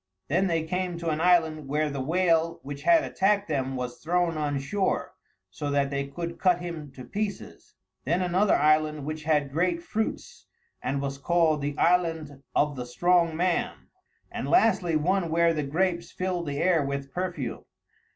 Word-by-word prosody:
Then 185 +6 +2
they 165 -2 0
came 180 +1 -2
to 170 -1 -2
an 155 +1 -2
island 160 -4 +3
where 150 +2 0
the 140 -1 -3
whale 165 +2 +1
which 140 0 -7
had 330 -2 +5
attacked 200 +1 +1
them 135 -4 -1
was 125 -1 -5
thrown 175 0 0
on 145 -2 -1
shore, 185 +8 -1 0.4
so 145 +9 -4
that 140 -1 +1
they 140 0 -2
could 170 +4 -6
cut 180 -2 +3
him 165 -5 -6
to 130 - -10
pieces; 205 -1 -5 0.3
then 170 +6 +1
another 185 +3 +3
island 155 -1 +2
which 155 0 -5
had 150 -3 +1
great 170 +2 0
fruits, 220 +4 -4 0.3
and 140 +1 -2
was 140 0 -4
called 160 -1 +2
The 145 0 -3
Island 165 -5 +1
of 145 -1 +2
the 125 -1 -5
Strong 170 +4 +2
Man; 185 +8 -1 0.4
and - - -4
lastly 215 - +3
one 175 +3 +1
where 170 +1 +3
the 155 - -1
grapes 170 +4 -1
filled 180 -2 -3
the 140 -1 -3
air 170 -2 +3
with 140 0 -4
perfume. 180 -8 -4
165 Hz, 170 wpm, -27 LUFS, 145-180 Hz, 0.4 s, had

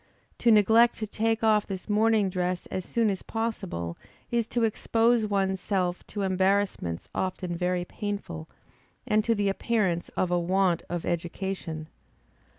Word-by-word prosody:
To 240 - +3
neglect 225 +2 +5
to 220 - -3
take 225 +1 -1
off 215 -2 +3
this 190 -2 -6
morning 215 -1 +3
dress 180 -1 -2
as 185 - -2
soon 230 -3 +1
as 190 - -4
possible, 195 - -3 0.3
is 235 -2 +1
to 240 -1 0
expose 225 +1 +2
one's 195 -2 0
self 180 -3 -1
to 205 -1 -3
embarrassments 190 - 0
often 185 -2 -2
very 180 0 0
painful, 180 -6 -5 0.6
and 215 -3 +2
to 230 +1 +2
the 205 -1 0
appearance 195 -4 0
of 180 - +1
a 175 - +3
want 180 0 +2
of 175 -1 -3
education. 175 -2 -3
195 Hz, 150 wpm, -27 LUFS, 180-220 Hz, 0.6 s, neglect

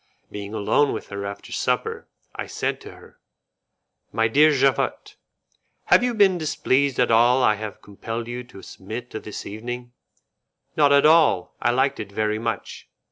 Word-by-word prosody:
Being 105 +1 -7
alone 125 +7 +2
with - - -7
her 100 0 -5
after 100 - -9
supper, - - -2 0.3
I - - -6
said - - -3
to - - -11
her, - - -18 0.9
"My 115 0 +1
dear 150 +7 +5
Javotte, 135 -2 0 0.7
have - - +5
you 245 -1 0
been 195 -4 +4
displeased 140 -3 0
at 125 -2 +3
all 120 +3 +4
I 105 - +5
have 105 0 -7
compelled 115 +3 -6
you 120 +1 -5
to 100 -5 -14
submit 115 +6 -8
to 110 - -5
this 105 - -8
evening?" 120 +3 -7 0.8
"Not 145 -2 +4
at 140 0 +5
all; 155 - +4
I 120 - +2
liked 130 +3 +1
it 100 -2 -6
very 110 +1 -1
much." 115 0 -5
120 Hz, 165 wpm, -23 LUFS, 110-140 Hz, 0.9 s, dear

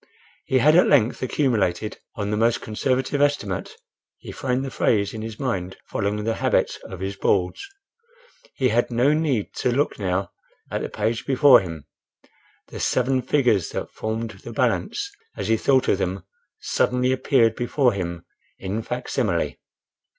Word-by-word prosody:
He 130 - +2
had 150 +5 +5
at 180 - +6
length 125 -5 +3
accumulated, 110 - 0 0.2
"on 105 -1 -3
the - - +1
most 115 +2 +2
conservative 130 +5 -1
estimate" 125 -10 0 0.4
(he - - -10
framed 130 0 -2
the 135 - -5
phrase 100 -4 +1
in 110 - -5
his 110 -1 -7
mind, 95 -9 -3
following 105 +1 -2
the 115 +1 0
habit - - 0
of 95 - -8
his 95 +1 -3
Boards)—he 395 - -3
had 120 +1 +1
no 125 +5 +3
need 150 -9 0
to 125 - +1
look 140 0 0
now 95 0 -1 0.4
at - - -2
the - - -3
page 115 +1 -2
before 135 -1 +7
him: 80 -6 -7 0.8
the - - -8
seven 130 +1 +1
figures 125 - +2
that - - -4
formed 110 +1 -3
the - - -8
balance, 405 -1 0 0.3
as - - -3
he 115 - +5
thought 130 +3 +2
of 95 - +2
them, 95 -1 -2 0.4
suddenly 125 +1 +1
appeared 125 -4 +3
before 125 0 +1
him 85 -3 -4 0.3
in 100 +4 -3
facsimile. 125 +2 -2
120 Hz, 155 wpm, -23 LUFS, 105-135 Hz, 0.8 s, before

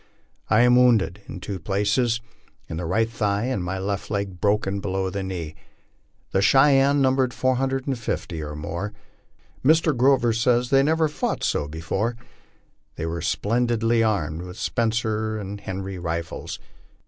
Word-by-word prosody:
I 110 - +5
am 125 0 +5
wounded 110 -6 +3
in - - -7
two 95 +1 -5
places, 105 +6 +1 0.5
in 80 - -5
the 85 0 -3
right 115 +6 +2
thigh 105 -3 -1
and 125 -7 -1
my 95 +2 -3
left 100 +1 -3
leg 100 -3 -3
broken 100 -1 +1
below 95 -1 -2
the 100 +1 -3
knee. 90 -5 -5 0.8
The 95 - +2
Cheyennes 135 +4 +5
numbered 130 -2 +2
450 130 - -1
or 75 0 -5
more. 85 +7 -4 0.7
Mr. 155 +1 +4
Grorer 125 -2 +3
says 120 +2 +2
they 135 0 +6
never 160 +3 +2
fought 150 - -2
so 75 - 0
be 80 +2 -7
fore. 105 +8 -1 0.8
They 80 - -4
were 85 0 -3
splendidly 115 +5 +1
armed 85 -8 0
with 90 +1 -9
Spencer 110 -2 -1
and 100 0 -6
Henry 95 -1 -5
rifles. 85 -1 -4
105 Hz, 150 wpm, -24 LUFS, 95-125 Hz, 0.8 s, they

